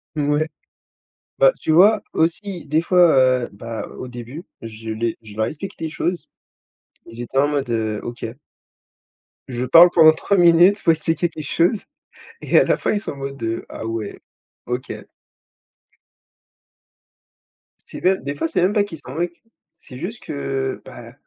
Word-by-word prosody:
Ouais. 150 Hz, +1 st, +1 dB, 0.9 s
Bah, -, -, +6 dB
tu -, -, 0 dB
vois 200 Hz, +6 st, +6 dB
aussi 175 Hz, +3 st, -1 dB
des 155 Hz, +2 st, +2 dB
fois, 175 Hz, 0 st, +4 dB, 0.3 s
heu, -, -, -7 dB
bah, 115 Hz, +3 st, -6 dB
au 130 Hz, -, -6 dB
début, 125 Hz, +7 st, -9 dB, 0.2 s
je 110 Hz, 0 st, -9 dB
l'ai 115 Hz, +1 st, -2 dB
je 105 Hz, -2 st, -12 dB
leur 110 Hz, -, +1 dB
explique 195 Hz, +6 st, -7 dB
des 160 Hz, -1 st, -4 dB
choses. 175 Hz, +3 st, -3 dB, 0.8 s
Ils 115 Hz, +1 st, -9 dB
étaient 120 Hz, +3 st, -5 dB
en 145 Hz, +2 st, +4 dB
mode: 140 Hz, -3 st, -2 dB
«heu, 110 Hz, -2 st, -1 dB
OK». 120 Hz, 0 st, -6 dB, 1.2 s
Je 125 Hz, -1 st, -3 dB
parle 165 Hz, +7 st, +8 dB
pendant 160 Hz, -3 st, +7 dB
3 195 Hz, +5 st, 0 dB
minutes 175 Hz, +4 st, +5 dB
pour 165 Hz, -, +5 dB
expliquer 160 Hz, +2 st, -1 dB
quelque 155 Hz, -2 st, -8 dB
chose. 175 Hz, -, +1 dB, 0.6 s
Et -, -, +2 dB
à -, -, +5 dB
la -, -, +2 dB
fin, -, -, -1 dB
ils 205 Hz, -, 0 dB
sont -, -, -4 dB
en 140 Hz, -, -10 dB
mode: 135 Hz, 0 st, -7 dB
«Heu, 115 Hz, 0 st, -3 dB
ah -, -, -7 dB
ouais, 115 Hz, -2 st, -5 dB, 0.5 s
OK». 125 Hz, +1 st, -4 dB, 3.0 s
C'est -, -, -8 dB
bien 190 Hz, +1 st, +3 dB
des 140 Hz, -5 st, -6 dB
fois, 155 Hz, -, -1 dB
c'est 165 Hz, -, 0 dB
même 185 Hz, +3 st, +2 dB
pas 210 Hz, -2 st, +3 dB
qu'ils 180 Hz, -7 st, -8 dB
s'en 130 Hz, -, -10 dB
moquent. 170 Hz, +1 st, -3 dB, 0.3 s
C'est 125 Hz, -, -12 dB
juste 185 Hz, -, -6 dB
que, 135 Hz, -2 st, -3 dB
bah, -, -, -11 dB
150 Hz, 165 wpm, -21 LUFS, 120-175 Hz, 3.0 s, parle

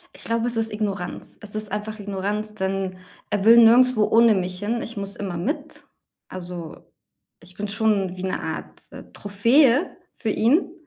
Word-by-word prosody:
Ich -, -, -6 dB
glaube, 230 Hz, 0 st, 0 dB
es 235 Hz, -, -1 dB
ist 225 Hz, -1 st, +1 dB
Ignoranz. 200 Hz, -4 st, -4 dB
Es 210 Hz, -1 st, -8 dB
ist 215 Hz, -2 st, -1 dB
einfach 215 Hz, +1 st, -4 dB
Ignoranz, 205 Hz, +2 st, -3 dB
denn 190 Hz, -2 st, -3 dB, 0.3 s
er 205 Hz, -2 st, 0 dB
will 230 Hz, +1 st, +8 dB
nirgendswo 235 Hz, 0 st, +6 dB
ohne 230 Hz, -1 st, +5 dB
mich 180 Hz, 0 st, -3 dB
hin. 230 Hz, +3 st, -2 dB
Ich 230 Hz, -, -8 dB
muss 200 Hz, -1 st, -5 dB
immer 185 Hz, -4 st, -5 dB
mit. 255 Hz, -, -4 dB, 0.4 s
Also, 175 Hz, -3 st, -8 dB, 0.6 s
ich 175 Hz, +2 st, -11 dB
bin 210 Hz, -, -3 dB
schon 200 Hz, -3 st, +1 dB
wie 185 Hz, -, -6 dB
'ne 190 Hz, -, -2 dB
Art, -, -, -6 dB
äh, -, -, -11 dB
Trophäe 230 Hz, +7 st, +2 dB, 0.2 s
für 225 Hz, -, -4 dB
ihn. 300 Hz, -, +2 dB
210 Hz, 170 wpm, -23 LUFS, 190-230 Hz, 0.6 s, will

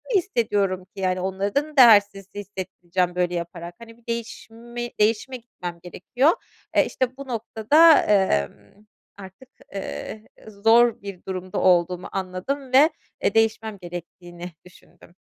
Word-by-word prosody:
hissediyorum 205 Hz, -, 0 dB
ki, 195 Hz, +1 st, -11 dB
yani, 185 Hz, -1 st, 0 dB
onları 195 Hz, +3 st, -3 dB
da 300 Hz, +1 st, -1 dB
değersiz 205 Hz, -5 st, +6 dB
hissettireceğim 185 Hz, -3 st, -3 dB
böyle 180 Hz, -1 st, 0 dB
yaparak, 170 Hz, 0 st, -6 dB
hani, 230 Hz, 0 st, -13 dB
bir 235 Hz, -, -27 dB
değişimi 235 Hz, +1 st, -6 dB
değişime 225 Hz, +4 st, +1 dB
gitmem 180 Hz, -7 st, -9 dB
gerekiyor, 250 Hz, -, +1 dB, 0.4 s
eee, -, -, +5 dB
işte 255 Hz, 0 st, -3 dB
bu 275 Hz, 0 st, -9 dB
noktada, 250 Hz, +7 st, +4 dB, 0.4 s
ımm, 200 Hz, -, -25 dB, 0.3 s
artık, 195 Hz, +6 st, -13 dB, 0.3 s
ııı, 200 Hz, +2 st, -6 dB, 0.4 s
zor 235 Hz, +1 st, +5 dB
bir 195 Hz, -2 st, -9 dB
durumda 185 Hz, -1 st, -5 dB
olduğumu 180 Hz, 0 st, +2 dB
anladım 195 Hz, +9 st, -4 dB
ve, 285 Hz, +4 st, +7 dB, 0.3 s
e, -, -, +1 dB
değişmem 225 Hz, -1 st, +1 dB
gerektiğini 175 Hz, 0 st, -9 dB
düşündüm. 180 Hz, -1 st, -19 dB
205 Hz, 125 wpm, -23 LUFS, 180-235 Hz, 0.4 s, ve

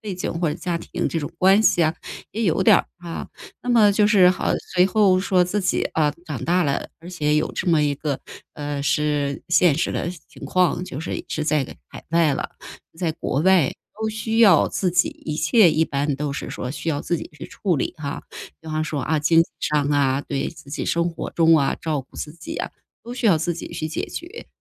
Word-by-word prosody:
背 205 Hz, -3 st, -5 dB
景 180 Hz, -, -3 dB
或 165 Hz, -1 st, -1 dB
者 -, -, -2 dB
家 175 Hz, -2 st, -3 dB
庭 -, -, -3 dB
这 165 Hz, -, -2 dB
种 145 Hz, -, -5 dB
关 195 Hz, +4 st, +5 dB
系 175 Hz, -, +4 dB
啊， 155 Hz, +1 st, +1 dB, 0.4 s
也 225 Hz, -, -2 dB
有 190 Hz, 0 st, +2 dB
点 -, -, +7 dB
儿， -, -, -4 dB
啊。 170 Hz, -2 st, -7 dB, 0.3 s
那 245 Hz, -, -8 dB
么 215 Hz, -4 st, +5 dB
就 205 Hz, 0 st, +3 dB
是 190 Hz, -4 st, +6 dB
好 185 Hz, -, -1 dB, 0.2 s
随 180 Hz, +1 st, +5 dB
后 195 Hz, -2 st, +3 dB
说 185 Hz, -1 st, +3 dB
自 195 Hz, +4 st, -1 dB
己， 185 Hz, -, 0 dB
啊， 155 Hz, -2 st, +2 dB
长 145 Hz, -7 st, -5 dB
大 180 Hz, +2 st, +2 dB
了， 140 Hz, -1 st, -1 dB
而 170 Hz, -, -11 dB
且 150 Hz, -4 st, 0 dB
有 155 Hz, -, 0 dB
这 -, -, -4 dB
么 160 Hz, -3 st, +4 dB
一 145 Hz, -1 st, +1 dB
个， 140 Hz, -1 st, -3 dB, 0.4 s
呃， 145 Hz, -1 st, -4 dB
是 145 Hz, -1 st, 0 dB
现 175 Hz, -3 st, +4 dB
实 165 Hz, -, 0 dB
的 -, -, -2 dB, 0.2 s
情 -, -, -17 dB
况 180 Hz, -1 st, +1 dB
就 145 Hz, -6 st, -6 dB
是 165 Hz, -, -4 dB
是 155 Hz, -, -2 dB
在 150 Hz, -3 st, +1 dB, 0.2 s
海 -, -, -11 dB
外 165 Hz, -3 st, +3 dB
了， -, -, -3 dB, 0.5 s
在 170 Hz, -4 st, 0 dB
国 145 Hz, -3 st, -2 dB
外 185 Hz, -7 st, +4 dB, 0.3 s
都 220 Hz, -, 0 dB
需 220 Hz, +1 st, -2 dB
要 200 Hz, -8 st, +6 dB
自 185 Hz, -, -1 dB
己 175 Hz, 0 st, +2 dB
一 150 Hz, -1 st, -6 dB
切 215 Hz, -1 st, +5 dB
一 155 Hz, +1 st, +2 dB
般 140 Hz, -1 st, -1 dB
都 145 Hz, 0 st, -3 dB
是 -, -, -5 dB
说 125 Hz, -, -5 dB
需 155 Hz, -, -5 dB
要 145 Hz, -3 st, -1 dB
自 170 Hz, -, -1 dB
己 -, -, -8 dB
去 -, -, -9 dB
处 185 Hz, -5 st, -1 dB
理， 135 Hz, -, -2 dB
啊， 145 Hz, -2 st, -5 dB, 0.4 s
比 160 Hz, -, -18 dB
方 155 Hz, 0 st, -1 dB
说， 150 Hz, -3 st, -3 dB
啊， 155 Hz, 0 st, 0 dB
经 165 Hz, +2 st, +4 dB
济 -, -, -9 dB
上 150 Hz, -1 st, +1 dB
啊， 140 Hz, -1 st, +2 dB
对， 140 Hz, -2 st, -2 dB
自 155 Hz, -4 st, -13 dB
己 145 Hz, -, -3 dB
生 170 Hz, +1 st, +1 dB
活 165 Hz, -, -6 dB
中 165 Hz, -1 st, +4 dB
啊、 140 Hz, -2 st, +1 dB
照 155 Hz, -3 st, -2 dB
顾 130 Hz, -, -17 dB
自 150 Hz, -, -5 dB
己 165 Hz, -1 st, -8 dB
啊， -, -, -3 dB, 0.3 s
都 240 Hz, -, -7 dB
需 245 Hz, -1 st, -1 dB
要 185 Hz, -6 st, +5 dB
自 170 Hz, +2 st, -1 dB
己 170 Hz, -, -7 dB
去 155 Hz, -, -4 dB
解 160 Hz, -, -3 dB
决。 355 Hz, +8 st, -8 dB
165 Hz, 250 characters per minute, -22 LUFS, 150-185 Hz, 0.5 s, 点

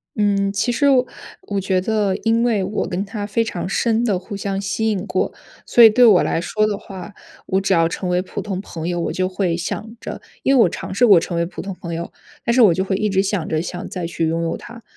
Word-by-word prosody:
嗯， 200 Hz, -1 st, +1 dB
其 200 Hz, +5 st, 0 dB
实 280 Hz, +4 st, +2 dB
我 260 Hz, -2 st, +4 dB, 0.4 s
我 200 Hz, -1 st, -1 dB
觉 190 Hz, -1 st, +1 dB
得 205 Hz, 0 st, 0 dB
因 230 Hz, +1 st, +2 dB
为 225 Hz, -5 st, +1 dB
我 210 Hz, +3 st, -2 dB
跟 185 Hz, +3 st, -2 dB
他 205 Hz, 0 st, -5 dB
非 215 Hz, +3 st, 0 dB
常 185 Hz, -6 st, -4 dB
深 230 Hz, +3 st, +1 dB
地 210 Hz, -6 st, +1 dB
互 195 Hz, +3 st, -8 dB
相 195 Hz, -1 st, -3 dB
吸 200 Hz, +3 st, -1 dB
引 205 Hz, -2 st, -2 dB
过， -, -, -1 dB, 0.3 s
所 240 Hz, -, +6 dB
以 225 Hz, -, +11 dB
对 245 Hz, +4 st, +4 dB
我 205 Hz, -6 st, +6 dB
来 165 Hz, -, 0 dB
说 215 Hz, +4 st, 0 dB
的 210 Hz, -1 st, -1 dB
话， 190 Hz, 0 st, -10 dB, 0.3 s
我 190 Hz, 0 st, 0 dB
只 195 Hz, 0 st, +1 dB
要 165 Hz, -1 st, +4 dB
成 180 Hz, +2 st, -4 dB
为 180 Hz, 0 st, +1 dB
普 185 Hz, -, -6 dB
通 195 Hz, -3 st, -4 dB
朋 170 Hz, -4 st, -6 dB
友， 175 Hz, -1 st, -1 dB
我 -, -, -2 dB
就 185 Hz, 0 st, 0 dB
会 185 Hz, -2 st, -1 dB
想 215 Hz, +6 st, -5 dB
着 -, -, -6 dB, 0.2 s
因 270 Hz, -, +3 dB
为 245 Hz, -, +6 dB
我 -, -, +4 dB
尝 175 Hz, -, -6 dB
试 240 Hz, +6 st, +4 dB
过 195 Hz, -5 st, +8 dB
成 170 Hz, +1 st, -4 dB
为 170 Hz, -, +1 dB
普 170 Hz, -, -7 dB
通 195 Hz, 0 st, -5 dB
朋 170 Hz, -1 st, -6 dB
友， 170 Hz, +1 st, -5 dB, 0.3 s
但 235 Hz, -, +1 dB
是 250 Hz, -, +4 dB
我 195 Hz, -7 st, +7 dB
就 190 Hz, -, 0 dB
会 195 Hz, 0 st, -1 dB
一 215 Hz, -, 0 dB
直 195 Hz, -2 st, +2 dB
想 195 Hz, -4 st, -2 dB
着 155 Hz, 0 st, 0 dB
想 180 Hz, +1 st, -6 dB
再 180 Hz, -2 st, -5 dB
去 165 Hz, -1 st, -1 dB
拥 165 Hz, +1 st, -1 dB
有 165 Hz, -, -2 dB
他。 230 Hz, -1 st, -12 dB
195 Hz, 280 characters per minute, -20 LUFS, 180-215 Hz, 0.4 s, 以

